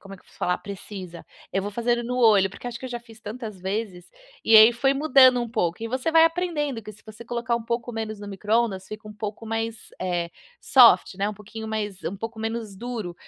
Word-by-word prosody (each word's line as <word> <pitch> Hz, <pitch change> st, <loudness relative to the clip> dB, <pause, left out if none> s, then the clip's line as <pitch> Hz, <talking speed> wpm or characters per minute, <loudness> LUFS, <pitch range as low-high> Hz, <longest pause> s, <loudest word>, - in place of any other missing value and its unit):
como 195 Hz, 0 st, -11 dB
é -, -, -12 dB
que -, -, -24 dB
vou -, -, -24 dB
falar? 180 Hz, -, 0 dB
Precisa. 190 Hz, -3 st, -9 dB, 0.3 s
Eu 195 Hz, -, +1 dB
vou 205 Hz, -, -4 dB
fazendo 240 Hz, +2 st, 0 dB
no 250 Hz, +1 st, -3 dB
olho, 210 Hz, -5 st, +5 dB
porque 245 Hz, -, -10 dB
acho 235 Hz, -1 st, -5 dB
que -, -, -11 dB
eu -, -, -6 dB
já 240 Hz, -1 st, -4 dB
fiz 225 Hz, -1 st, -16 dB
tantas 215 Hz, -2 st, -7 dB
vezes. 190 Hz, -2 st, -4 dB, 0.3 s
E 225 Hz, -, +7 dB
aí 220 Hz, +2 st, +9 dB
foi 270 Hz, +3 st, +1 dB
mudando 265 Hz, -3 st, +5 dB
um 235 Hz, -, -4 dB
pouco, 195 Hz, -3 st, -1 dB
e 230 Hz, -, -3 dB
você 260 Hz, +6 st, -1 dB
vai 325 Hz, 0 st, +6 dB
aprendendo 325 Hz, -8 st, -1 dB
que 215 Hz, -, -9 dB
se 205 Hz, -, -19 dB
você 215 Hz, +1 st, -11 dB
colocar 235 Hz, 0 st, -2 dB
um 235 Hz, -, -5 dB
pouco 235 Hz, +1 st, -3 dB
menos 220 Hz, -1 st, -4 dB
no 205 Hz, -, -8 dB
microondas 205 Hz, -1 st, 0 dB
fica 215 Hz, 0 st, -9 dB
um 210 Hz, -, -9 dB
pouco 210 Hz, +1 st, -6 dB
mais, 225 Hz, 0 st, -4 dB
eh, 175 Hz, -2 st, -2 dB, 0.3 s
soft, 235 Hz, -9 st, +6 dB
né, 200 Hz, +1 st, 0 dB
um 210 Hz, -, -5 dB
pouquinho 220 Hz, +2 st, -9 dB
mais 210 Hz, -3 st, -4 dB
um 200 Hz, -, -3 dB
pouco 225 Hz, +2 st, -7 dB
menos 225 Hz, -2 st, -4 dB
duro, 225 Hz, -6 st, -5 dB
220 Hz, 235 wpm, -24 LUFS, 205-240 Hz, 0.3 s, aí